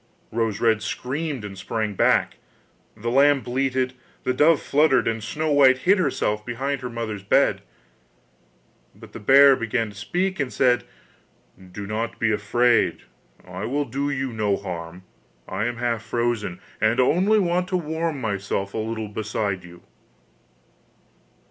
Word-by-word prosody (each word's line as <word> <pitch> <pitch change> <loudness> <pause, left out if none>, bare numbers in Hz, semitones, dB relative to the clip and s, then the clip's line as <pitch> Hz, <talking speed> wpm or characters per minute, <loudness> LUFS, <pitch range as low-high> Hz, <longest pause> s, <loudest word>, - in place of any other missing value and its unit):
Rose 115 -2 -1
red 110 -2 +2
screamed 135 0 -4
and 100 -1 -8
sprang 105 +2 -3
back, - - +2 0.6
the 120 +3 -3
lamb 140 +1 +4
bleated, 130 0 -1 0.3
the 125 - 0
dove 150 +4 +4
fluttered, 140 -4 +2
and 115 -1 -2
Snow 155 +7 -2
white 135 -2 +6
hid 190 +9 +3
herself 105 -11 0
behind 130 +4 -3
her 125 - -5
mother's 115 -4 -5
bed. 100 - +2 1.3
But - - -15
the - - -7
bear 135 +5 +7
began 115 -2 -2
to 100 - -14
speak 180 - -2
and 140 -3 -1
said: 125 -2 +2 0.9
'Do 100 +2 -7
not 110 +3 -3
be 110 -1 +1
afraid, 120 +3 +2 0.4
I - - -6
will 145 +3 -1
do 140 +4 -2
you 135 -3 -2
no 105 -3 0
harm! 90 -2 -7 0.4
I 95 +3 -2
am 120 0 -2
half 120 -2 -1
frozen, 115 -6 -2 0.2
and 110 +3 +2
only 185 +11 +3
want 180 -2 +1
to 185 - 0
warm 160 -2 -3
myself 100 -3 -3
a - - -2
little 110 0 -3
beside 105 -3 -3
you. 85 0 -14
120 Hz, 150 wpm, -23 LUFS, 105-140 Hz, 1.3 s, bear